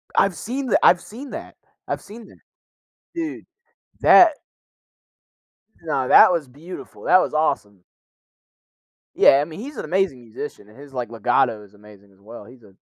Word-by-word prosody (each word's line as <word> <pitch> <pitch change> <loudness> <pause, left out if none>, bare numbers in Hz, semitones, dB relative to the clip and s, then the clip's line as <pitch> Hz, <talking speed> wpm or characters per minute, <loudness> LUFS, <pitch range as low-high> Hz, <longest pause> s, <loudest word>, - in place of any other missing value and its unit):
I've 195 -3 +2
seen 260 - -5
tha - - +2
I've 175 - +5
seen 255 +6 -11
that. - - -9 0.3
I've - - -4
seen 220 +2 -13
that. - - -19 0.8
Dude, 325 -2 -5 0.6
that 340 -3 +7 1.5
No, 135 -6 -2
that - - +7
was 165 -5 -2
beautiful, 155 +8 -12
that 185 - +5
was - - -3
awesome. 105 - -2 1.3
Yeah, 135 - +5
I 145 - -2
mean, 160 +4 -11
he's 270 +3 -9
an - - -5
amazing 175 -6 -1
musician, 115 -1 -9
his, 140 +6 -15
like, 125 -3 -5
legato 115 -2 0
is 105 0 -19
amazing 100 -1 -18
as 95 - -27
well. 105 +1 -12
He's 120 +1 -17
a 100 -2 -19
145 Hz, 160 wpm, -21 LUFS, -, 1.5 s, that